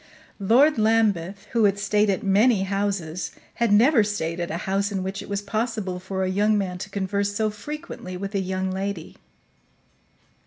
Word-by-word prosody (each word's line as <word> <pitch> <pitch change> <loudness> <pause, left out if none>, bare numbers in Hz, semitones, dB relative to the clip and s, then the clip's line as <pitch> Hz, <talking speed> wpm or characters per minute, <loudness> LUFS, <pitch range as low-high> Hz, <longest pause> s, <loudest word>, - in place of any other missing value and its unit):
Lord 250 +8 +4
Lambeth, 205 -4 +1
who 230 -2 +3
had 200 -1 +3
stayed 210 +1 +2
at 195 +3 0
many 200 +1 +4
houses, 195 -4 -2 0.3
had 235 -3 +3
never 230 +3 +5
stayed 175 -5 -2
at 175 - -2
a 165 - -2
house 195 +2 0
in 190 -2 -2
which 195 +1 -4
it - - -10
was 200 0 -2
possible 215 -3 -2
for 190 +1 -3
a - - 0
young 205 +3 +2
man 185 -3 -2
to 195 - -6
converse 200 +1 -1
so 215 0 +1
frequently 210 -5 -7
with 195 +2 -5
a 200 - +1
young 190 0 -2
lady. 190 -2 -4
200 Hz, 180 wpm, -24 LUFS, 190-215 Hz, 0.3 s, never